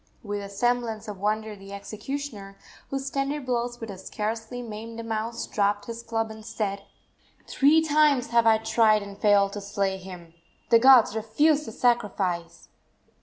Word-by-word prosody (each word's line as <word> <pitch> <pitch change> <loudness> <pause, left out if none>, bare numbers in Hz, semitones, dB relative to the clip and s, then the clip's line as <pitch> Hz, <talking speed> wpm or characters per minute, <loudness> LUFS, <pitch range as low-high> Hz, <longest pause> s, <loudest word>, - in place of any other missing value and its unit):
With 205 -1 -4
a 200 - -7
semblance 230 +1 -1
of 205 -3 -7
wonder 215 +1 -1
the 195 0 -11
executioner, 210 0 -6 0.3
whose 270 0 -3
tender 275 +2 -1
blows 240 -2 -2
would 225 -2 -6
have 190 - -9
scarcely 225 +5 -4
maimed 225 0 -8
a - - -5
mouse, 225 +1 -3
dropped 205 0 0
his 230 0 -6
club 225 -1 -2
and 220 0 -10
said: 205 -3 -3 0.6
"Three 305 +4 +4
times 295 -5 +3
have 235 -1 +3
I 220 -1 +6
tried 220 -1 +3
and 200 0 -9
failed 200 -1 +3
to 205 - -5
slay 195 -1 -1
him! 180 -3 -11 0.4
The 230 - +7
gods 250 -3 +6
refuse 290 +8 +2
the - - -5
sacrifice!" 195 -8 -1
220 Hz, 165 wpm, -26 LUFS, 200-240 Hz, 0.6 s, The